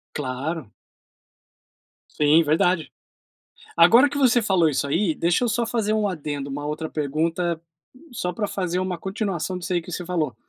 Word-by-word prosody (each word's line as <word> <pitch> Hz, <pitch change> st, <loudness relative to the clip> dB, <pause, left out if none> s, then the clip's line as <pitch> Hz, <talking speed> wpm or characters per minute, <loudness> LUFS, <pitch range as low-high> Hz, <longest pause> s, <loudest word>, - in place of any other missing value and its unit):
Claro. 140 Hz, -1 st, -4 dB, 1.4 s
Sim, 150 Hz, +2 st, +4 dB
verdade. 160 Hz, +2 st, +1 dB, 0.9 s
Agora 235 Hz, +12 st, +7 dB
que 285 Hz, -, -5 dB
você 245 Hz, -3 st, +4 dB
falou 185 Hz, -6 st, +3 dB
isso 140 Hz, 0 st, -1 dB
aí, 165 Hz, +3 st, +1 dB
deixa 170 Hz, +9 st, +1 dB
eu 240 Hz, -, +1 dB
só 230 Hz, +2 st, 0 dB
fazer 220 Hz, -2 st, 0 dB
um 215 Hz, -1 st, +1 dB
adendo, 145 Hz, -5 st, -4 dB
uma 145 Hz, +2 st, -5 dB
outra 155 Hz, +1 st, -4 dB
pergunta, 160 Hz, +3 st, -1 dB, 0.5 s
só 180 Hz, -7 st, -3 dB
pra 205 Hz, +4 st, -2 dB
fazer 180 Hz, -2 st, -2 dB
uma 185 Hz, -1 st, -2 dB
continuação 190 Hz, -1 st, -3 dB
disso 180 Hz, +1 st, -4 dB
aí 175 Hz, -, +1 dB
que 180 Hz, -, -11 dB
você 175 Hz, +2 st, -4 dB
falou. 155 Hz, -9 st, -2 dB
175 Hz, 160 wpm, -23 LUFS, 155-195 Hz, 1.4 s, Agora